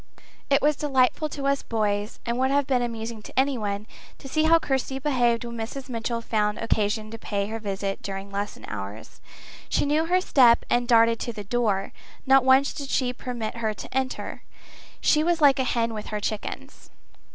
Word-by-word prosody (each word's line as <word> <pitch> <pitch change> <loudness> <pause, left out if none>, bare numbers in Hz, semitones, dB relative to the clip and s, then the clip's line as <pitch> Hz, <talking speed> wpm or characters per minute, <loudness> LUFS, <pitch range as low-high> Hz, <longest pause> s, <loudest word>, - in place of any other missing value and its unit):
It 275 0 +3
was 300 0 +4
delightful 280 +1 +1
to 280 -1 -5
us 275 0 +2
boys, 210 -1 -2
and 235 +1 -1
would 260 0 +2
have 280 0 +2
been 255 -2 +1
amusing 230 -2 -4
to 215 - -3
anyone, 215 -7 0 0.3
to - - -11
see 310 +3 +1
how 330 +1 +6
Kirsty 265 -3 -2
behaved 245 -4 +1
when 235 0 -6
Mrs. 245 +4 -6
Mitchell 230 0 -2
found 210 -2 0
occasion 215 0 -1
to 225 - -8
pay 200 -2 -2
her 225 - -3
a - - -8
visit 195 -2 -3
during 195 0 -6
lesson 200 +1 -4
hours. 100 +1 -7 0.5
She - - +1
knew 305 +3 +1
her 365 +2 +3
step 250 -9 +5
and 240 0 +2
darted 230 -1 +5
to 235 - -4
the 210 -2 -6
door. 205 -3 0 0.3
Not 270 -1 +6
once 265 +2 +4
did 280 -2 -6
she 250 -2 0
permit 240 -3 -5
her 220 -2 -1
to - - -9
enter. 265 -1 -2 0.6
She 305 0 +4
was 340 0 +1
like 280 -2 +5
a - - +3
hen 230 -2 0
with 215 -1 -6
her 210 - -3
chickens. 210 0 -5
235 Hz, 195 wpm, -25 LUFS, 215-270 Hz, 0.6 s, how